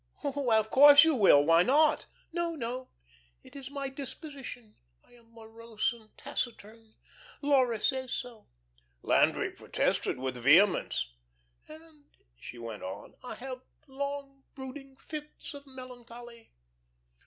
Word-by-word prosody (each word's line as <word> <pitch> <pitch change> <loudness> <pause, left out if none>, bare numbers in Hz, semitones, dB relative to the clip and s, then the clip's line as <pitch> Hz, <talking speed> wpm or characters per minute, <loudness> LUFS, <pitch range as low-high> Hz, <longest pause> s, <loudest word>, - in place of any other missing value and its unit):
Why, 275 -5 +1
of 220 0 0
course 285 +1 +9
you 320 -1 +3
will. 190 - +6
Why 165 +1 +6
not?" 295 - +3 0.3
"No, 340 -1 -1
no. 255 -1 -5 0.5
It - - -16
is 270 -1 -8
my 280 -1 -4
disposition. 270 -4 -9 0.3
I - - -27
am 230 -1 -22
morose 225 +1 -4
and 220 -2 -17
taciturn. 225 -5 -6 0.5
Laura 260 -6 +3
says 260 +2 -1
so." 240 -3 -6 0.6
Landry - - +2
protested - - -1
with 130 0 -4
vehemence. 140 - +3 0.5
"And," 310 -1 -15 0.3
she - - -11
went 115 -3 -7
on, 95 +2 -8
"I 250 - -6
have 255 0 -7 0.2
long, 280 0 -6
brooding 270 0 -9
fits 305 +2 -8
of 285 0 -11
melancholy." 240 -3 -12
255 Hz, 125 wpm, -30 LUFS, 220-280 Hz, 0.6 s, course